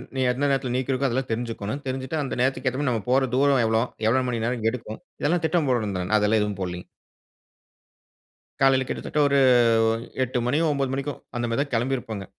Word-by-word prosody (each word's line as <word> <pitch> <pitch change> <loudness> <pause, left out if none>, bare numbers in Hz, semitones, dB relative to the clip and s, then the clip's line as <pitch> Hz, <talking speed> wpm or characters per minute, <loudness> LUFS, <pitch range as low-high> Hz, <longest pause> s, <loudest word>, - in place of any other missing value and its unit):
நீ 130 - 0
எந்த 130 +3 -3
நேரத்தில 135 -3 0
நீக்கி 130 +1 -1
இருக்கும், 135 +1 +1
அதெல்லாம் 130 0 -2
தெரிஞ்சுக்கோணும், 115 +2 -3
தெரிஞ்சிட்டு 130 +4 -3
அந்த 135 - -4
நேரத்துக்கு 130 0 +1
ஏத்த 130 - -6
மாரி 140 - +1
நம்ம 115 -4 -2
போற 130 -1 +3
தூரம் 140 -2 +3
எவ்வளோ? 110 +1 +2 0.2
எவ்வளவு 130 +2 +2
மணி 115 -2 -2
நேரம் 120 -2 -2
எடுக்கும்? 110 -3 -7 0.2
இதெல்லாம் 165 +2 +1
திட்டம் 160 -3 +1
போடணும் 110 -6 0
தா 90 - -2 0.2
அதெல்லாம் 105 +1 +2
எதுவும் 105 -2 -2
போடலைங்க. 90 -1 -5 1.7
காலையில 135 -1 +4
கிட்டத்தட்ட 150 - -3
ஒரு 140 0 +2 0.9
8 125 0 -2
மணி 140 +5 +1
9 135 -2 -1
மணிக்கோ, 140 +2 -2 0.2
அந்த 120 0 -1
மாதி 115 +4 -1
தான் 140 -1 -4
கெளம்பி 125 +4 +1
இருப்போங்க, 110 -5 -6
130 Hz, 190 wpm, -24 LUFS, 115-135 Hz, 1.7 s, காலையில